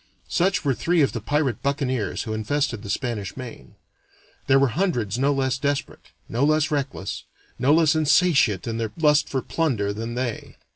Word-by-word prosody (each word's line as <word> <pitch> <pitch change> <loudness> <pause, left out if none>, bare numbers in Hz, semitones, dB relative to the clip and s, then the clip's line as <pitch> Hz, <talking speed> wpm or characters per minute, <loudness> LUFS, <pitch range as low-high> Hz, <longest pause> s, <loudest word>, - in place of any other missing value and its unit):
Such 180 -1 +1
were 140 - +3
three 170 +4 +2
of 135 - +1
the 115 - -5
pirate 145 +2 0
buccaneers 130 -7 -1
who 110 - -4
infested 120 +2 -1
the 100 - -9
Spanish 105 -1 -3
Main. 120 -5 -9 0.7
There 135 - +5
were 135 -1 +3
hundreds 120 - -1
no 140 +2 +3
less 130 -2 0
desperate, 145 0 -3 0.2
no 120 +4 -1
less 155 +2 +2
reckless, 140 -9 -3 0.3
no 130 +3 +3
less 155 -1 +5
insatiate 150 - +3
in 115 -1 -3
their 110 -2 -2
lust 150 -2 +3
for 135 -2 -2
plunder, 115 -12 -1
than 115 +3 -5
they. 125 -2 -4
135 Hz, 175 wpm, -24 LUFS, 115-150 Hz, 0.7 s, There